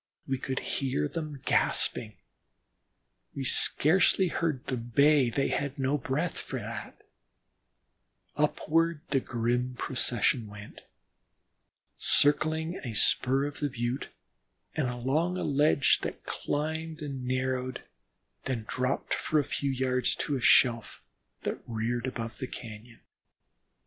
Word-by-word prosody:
We 135 -1 -1
could 130 0 -4
hear 130 - -1
them 150 - -6
gasping; 110 -3 +1 1.2
we 140 - -3
scarcely 180 +7 +5
heard 155 -6 -2
them 120 -2 -4
bay 140 -3 +5
they 135 +4 0
had 140 0 -2
no 135 +2 0
breath 150 +7 -2
for - - -5
that; - - -7 1.3
upward 165 0 +1
the 135 - +3
grim 125 +1 -1
procession 125 -2 0
went, 100 0 -11 1.2
circling 160 +4 +3
a 120 -4 -4
spur 135 +6 +2
of 145 0 -6
the 145 - -1
Butte 125 +1 -3 0.6
and 150 -5 0
along 140 +9 0
a - - -2
ledge 145 -1 +3
that - - -6
climbed 160 +1 -3
and 135 -3 -5
narrowed, 130 0 -2 0.6
then 120 -5 -3
dropped 130 +2 -1
for 155 - 0
a 150 - +3
few 140 0 -2
yards 130 -1 0
to 145 - -2
a 130 - -3
shelf 115 - +4 0.4
that - - -3
reared 120 +2 -2
above 115 -3 -5
the 130 - -4
cañon. 115 0 -10
130 Hz, 125 wpm, -29 LUFS, 125-150 Hz, 1.3 s, scarcely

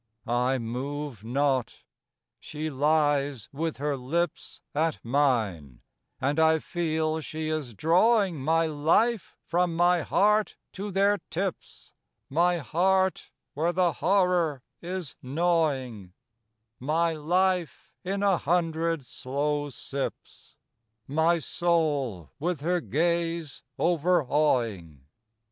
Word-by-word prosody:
I 125 +3 +1
move 130 0 -5
not; 130 +1 -1 0.6
she 155 +1 -5
lies 145 -3 +1
with 160 +3 -3
her 145 +1 -1
lips 160 +7 -3
At 160 +1 0
mine; 110 - 0 0.4
and 145 +4 0
I 160 0 +5
feel 160 -1 -1
she 155 0 -4
is 150 -8 -3
drawing 185 - +3
My 165 +3 +3
life 165 +8 +1
from 175 0 0
my 175 0 +3
heart 210 +6 +2 0.2
to 200 +2 -5
their 200 +1 +2
tips, 185 +1 -5 0.4
My 175 +4 +3
heart 185 +4 +1 0.2
where 165 +4 0
the 175 0 +2
horror 175 -7 +1 0.2
is 175 -4 -4
gnawing; 135 - -1 0.7
My 160 +5 +1
life 180 +2 0
in 195 +2 -2
a 195 -3 +4
hundred 165 -2 0
slow 145 +4 -2
sips, 135 +1 -7 0.5
My 160 +4 +2
soul 145 - -1
with 170 -1 -2
her 175 +3 0
gaze 170 -1 -1 0.2
overawing. 140 - +1
160 Hz, 105 wpm, -27 LUFS, 140-175 Hz, 0.7 s, I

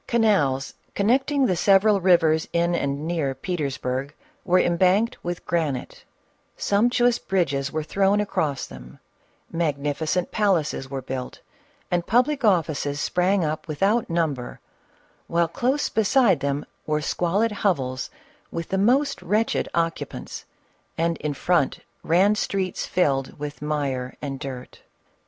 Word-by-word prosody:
Canals, 175 - +2 0.2
connecting 265 +6 +2
the 185 - +1
several 195 +3 +4
rivers 165 -3 +4
in 170 +1 +2
and 140 -2 -1
near 160 -6 -1
Petersburg, 140 -3 -3 0.3
were 180 +1 +3
embanked 185 +6 +2
with 175 0 -4
granite; 155 -7 -2 0.5
sumptuous 240 +3 +2
bridges 140 -7 -1
were 155 0 -2
thrown 195 +5 +2
across 155 -9 -1
them; 65 0 -12 0.5
magnificent 155 +2 -1
palaces 170 -10 0
were 135 -1 -5
built 130 -1 -5 0.5
and 175 -1 0
public 260 +4 +2
offices 155 -8 +1
sprang 180 +3 +1
up 155 +2 -3
without 195 +9 +1
number, 155 -7 -2 0.7
while 170 0 +2
close 260 - 0
beside 220 - +3
them 140 +1 -2 0.2
were 150 0 +1
squalid 180 +8 0
hovels 135 -12 -1 0.4
with 165 -1 -5
the 190 - 0
most 265 +8 +2
wretched 215 +5 0
occupants, 165 -1 -3 0.5
and 165 +1 +1
in 150 -1 -3
front 160 0 +1 0.2
ran 185 +6 +3
streets 195 -3 -2
filled 135 -7 0
with 145 0 -6
mire 140 -4 -2
and 135 -2 -5
dirt. 130 -2 -8
170 Hz, 125 wpm, -24 LUFS, 145-200 Hz, 0.7 s, several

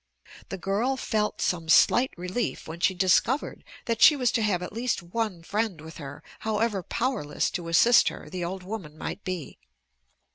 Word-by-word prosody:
The 195 - -4
girl 205 +8 0
felt 215 -4 -1
some 165 -3 -1
slight 250 +9 +5
relief 185 +6 -3
when 160 +2 -7
she 190 +1 +2
discovered 190 +9 +1 0.2
that 230 -1 -2
she 315 -2 +9
was 250 -4 +1
to 240 - 0
have 195 -5 0
at - - -7
least 235 -4 -1
one 185 -1 -3
friend 210 -2 -2
with 160 +1 -11
her, 145 -2 -9 0.2
however 215 -2 0
powerless 205 - -1
to 170 -2 -4
assist 230 +9 +5
her - - -4
the 185 -2 -5
old 185 +2 -4
woman 180 -6 -7
might - - -6
be. 180 - -5
195 Hz, 175 wpm, -26 LUFS, 175-230 Hz, 0.2 s, she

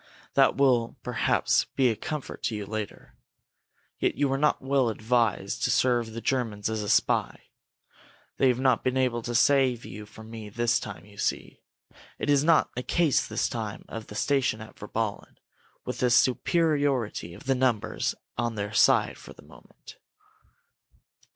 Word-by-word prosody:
"That 135 -1 +4
will, 125 -3 +2
perhaps, 125 -2 +1
be 130 -2 +4
a - - -2
comfort 150 +5 -6
to 110 - -1
you 105 -1 -4
later. 110 -1 -6 0.9
Yet - - +1
you 145 -1 +1
were 135 - 0
not 150 +1 +2
well 135 -2 +1
advised 115 -1 0
to - - +2
serve 120 -3 +2
the 115 - -6
Germans 110 -6 -1
as 110 -1 -2
a 105 - -4
spy. - - +2 1.0
They 135 - +4
have 125 -1 +2
not 130 -3 +2
been 130 +1 0
able 125 -2 +1
to 120 +1 -4
save 130 -2 +3
you 105 +2 -9
from 110 +1 -13
me 110 -2 -8
this 120 +2 +1
time, 100 -6 -8
you 100 -1 -16
see. - - -3 0.6
It 145 - 0
is 140 -1 +4
not 165 0 +3
a 125 - -2
case 160 +2 +1
this - - -1
time 110 -3 -5
of 115 -1 -7
the 105 - -10
station 135 -3 +1
at 110 0 -11
Virballen, 105 0 -4 0.5
with - - -5
the 125 - +2
superiority 130 - +1
of - - -14
numbers 130 -5 0 0.2
on 120 -1 -1
their 105 0 -4
side - - +3
for - - -12
the - - -17
moment." - - -16
120 Hz, 165 wpm, -27 LUFS, 110-135 Hz, 1.0 s, That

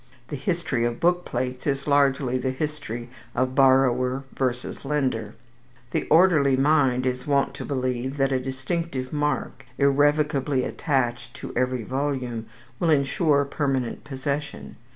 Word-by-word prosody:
The - - -3
history 140 -4 -1
of 120 0 -1
book 175 +1 +2
plates 125 +2 -3
is 140 -1 -1
largely 140 -3 +2
the 130 - -1
history 130 -4 -4 0.2
of 130 0 0
borrower 130 -1 +3
versus 125 -2 -3
lender. 130 -7 -1 0.6
The - - -1
orderly 155 -6 +5
mind 135 -3 +3
is 125 +1 -2
wont 140 -1 +2
to - - -7
believe 130 0 -2
that 135 -1 +2
a 130 - +2
distinctive 130 +2 -3
mark, 150 -2 -1
irrevocably 145 -1 +2
attached 120 -6 -1
to - - -8
every 125 -1 0
volume, 130 -3 -3 0.3
will 170 - +1
insure 145 0 +3
permanent 135 -4 -2
possession. 145 +1 -4
135 Hz, 130 wpm, -25 LUFS, 130-145 Hz, 0.6 s, orderly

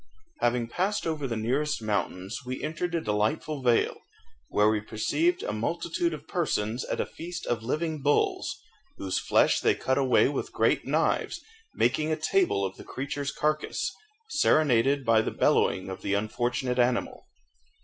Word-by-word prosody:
_ - - -42 0.4
Having 120 -1 +1
passed 190 - -1
over 155 -4 -2
the 115 -3 -3
nearest 135 +7 0
mountains 100 -2 -2
we 130 +1 -5
entered 170 +3 -2
a 165 - 0
delightful 110 +8 -1
vale, 120 -2 +2 0.5
where 105 0 +3
we 110 -1 +2
perceived 330 - 0
a - - -2
multitude 340 -1 -1
of - - -8
persons 120 - -1
at - - -3
a - - +1
feast 175 +2 -7
of 120 -2 -1
living 155 +5 -2
bulls, 145 +1 +1 0.4
whose 95 -1 -1
flesh - - +3
they - - +3
cut 130 +1 0
away 130 -2 +4
with 140 - -3
great - - +2
knives, - - +1 0.4
making 150 +6 +1
a - - +2
table 155 - +1
of 95 0 -5
the - - -10
creature's 140 +1 -4
carcase, 155 - -1 0.4
serenaded 140 - +3
by 115 -1 +5
the - - -2
bellowing 95 - +2
of 95 0 -6
the 100 - 0
unfortunate 120 +4 -1
animal. 120 0 0
130 Hz, 160 wpm, -28 LUFS, 110-155 Hz, 0.5 s, by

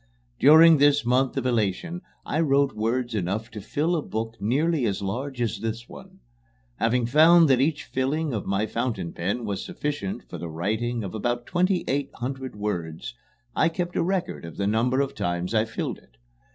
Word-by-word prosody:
During 160 +1 +8
this 145 -2 +4
month 130 +2 +2
of 130 - -1
elation 120 - -1 0.2
I 155 - -1
wrote 140 -3 +3
words 120 +3 -1
enough 105 +3 -2
to 105 - -7
fill 155 - 0
a 160 - 0
book 115 -3 -4
nearly 140 +4 +1
as 100 -1 -2
large 125 +7 -4
as 115 -4 -1
this 115 +1 -4
one. - - -13 0.6
Having 115 +1 +1
found 160 +6 +6
that 130 -1 +4
each 150 +1 0
filling 140 +3 -1
of 105 - -3
my 100 +2 +1
fountain 110 -6 -3
pen 100 +7 -2
was 100 -2 -3
sufficient 145 -10 -4
for - - -8
the 85 - -5
writing 110 +8 -2
of 95 - -6
about 120 +2 -2
twenty 180 +1 +1
eight 140 +1 -1
hundred 130 0 -5
words, 100 0 -4 0.4
I 165 - +3
kept 175 +1 -4
a - - +2
record 185 +1 -2
of 85 -1 -9
the 100 - -1
number 120 +6 +2
of 140 - -2
times 90 +3 -2
I 110 0 +3
filled 110 - -4
it. - - -27
120 Hz, 185 wpm, -25 LUFS, 105-145 Hz, 0.6 s, During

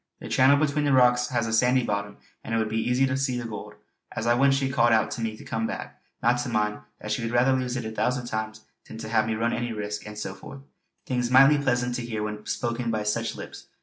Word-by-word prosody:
The - - -8
channel 135 +2 +5
between 150 0 +1
the 140 - +2
rocks 125 -1 +4
has 120 -2 -1
a 110 - -3
sandy 125 +2 +3
bottom, 100 -1 -3 0.3
and 115 - -3
it - - +2
would 110 -1 +1
be 110 +1 -1
easy 125 +2 +3
to 135 +1 -1
see 135 -2 -1
the 120 - -4
gold. 105 -2 -8 0.4
As 115 - -4
I 120 - +4
went 135 +3 +4
she 135 -1 0
called 120 -3 +3
out 110 - +2
to - - -4
me 110 -1 -3
to - - -12
come 115 0 -2
back, - - -7 0.2
not 120 +1 +3
to 120 - -3
mind, 105 0 0 0.2
that 105 - -6
she 105 - -1
would 115 - -2
rather 120 +3 +3
lose 125 -1 -1
it 125 - -4
a 110 - -4
thousand 125 +3 -1
times 110 -1 -4 0.3
than - - -9
have 110 0 0
me 110 - -1
run 115 +2 0
any 120 0 -2
risk, 105 0 -5
and 105 0 -9
so - - -4
forth; 70 0 -11 0.4
things 125 -1 -1
mightily 135 +3 +6
pleasant 125 -2 0
to - - -4
hear 110 -2 -3
when 105 0 -5
spoken 120 0 -2
by 110 -2 -1
such 115 +2 -1
lips. - - -10
120 Hz, 260 wpm, -26 LUFS, 110-125 Hz, 0.4 s, mightily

